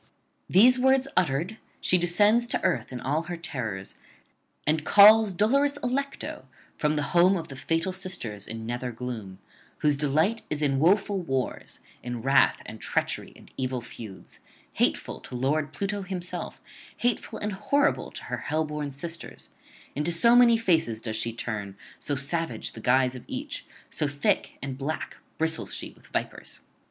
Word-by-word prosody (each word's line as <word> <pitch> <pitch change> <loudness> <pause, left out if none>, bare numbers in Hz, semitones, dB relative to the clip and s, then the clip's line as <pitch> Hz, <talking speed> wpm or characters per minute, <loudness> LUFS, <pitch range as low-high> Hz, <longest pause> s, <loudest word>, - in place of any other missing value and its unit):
These 250 +7 +6
words 265 +1 +4
uttered, 170 +7 +1 0.2
she 180 - +3
descends 205 +7 +4
to - - -1
earth 130 -11 0
in 125 - -5
all 145 +6 0
her 175 - -3
terrors, 115 - -5 0.7
and 155 +1 +1
calls 210 +2 +8
dolorous 275 +10 +2
Allecto 275 +3 -3 0.3
from 150 0 +1
the 150 - 0
home 180 +2 +5
of 165 - -6
the 135 - -7
Fatal 165 +7 -1
Sisters 180 - -2
in 110 0 -6
nether 125 +1 -3
gloom, 115 -5 -6 0.4
whose 150 -1 +4
delight 155 +10 +1
is 150 0 -1
in 135 -2 +2
woeful 195 +4 +3
wars, 135 -6 -3 0.2
in 120 -2 -5
wrath 135 +1 +4
and - - -9
treachery - - -1
and - - -17
evil 130 -1 -1
feuds: 110 -4 -10 0.3
hateful - - 0
to - - -12
[327 145 +3 +1
360]lord - - -22
Pluto 200 0 -2
himself, 185 -2 -4 0.4
hateful 245 -1 -1
and 210 - -3
horrible 285 +9 +1
to - - -8
her - - -4
hell 155 +2 -1
born 150 -1 -4
sisters; 165 +5 -6 0.4
into 150 +4 0
so 235 +8 +5
many 240 -1 +7
faces 165 - +1
does 110 -1 -4
she 115 +1 -1
turn, 105 -4 -5 0.2
so 145 - -1
savage 140 -2 -3
the 110 - -10
guise 130 +2 +3
of 125 - -8
each, - - -5 0.2
so 150 - 0
thick 145 0 0
and 135 -1 -5
black 150 +3 -4 0.2
bristles 160 0 -1
she - - -7
with - - -21
vipers. - - -4
155 Hz, 165 wpm, -27 LUFS, 130-195 Hz, 0.7 s, calls